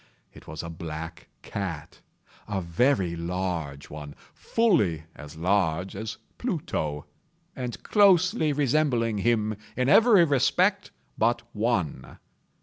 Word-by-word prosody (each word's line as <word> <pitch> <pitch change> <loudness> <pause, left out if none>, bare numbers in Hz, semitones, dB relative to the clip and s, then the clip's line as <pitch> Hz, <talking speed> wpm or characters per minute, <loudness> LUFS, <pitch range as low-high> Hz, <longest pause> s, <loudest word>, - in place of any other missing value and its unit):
It - - -15
was 80 - -6
a 85 - -6
black 80 0 -7 0.2
cat—a 95 +2 -7
very 90 +1 +1
large 85 -5 -4
one—fully 80 - -1
as 75 +1 -11
large 90 0 0
as 105 +1 -5 0.2
Pluto, 80 - -3 0.5
and 125 -2 -5
closely 185 -6 +4
resembling 135 -6 +1
him 110 -1 +1 0.2
in 125 +1 +1
every 220 -1 +7
respect 180 +8 +2 0.3
but 115 +1 +2
one. 100 - -1
105 Hz, 100 wpm, -26 LUFS, 80-140 Hz, 0.5 s, every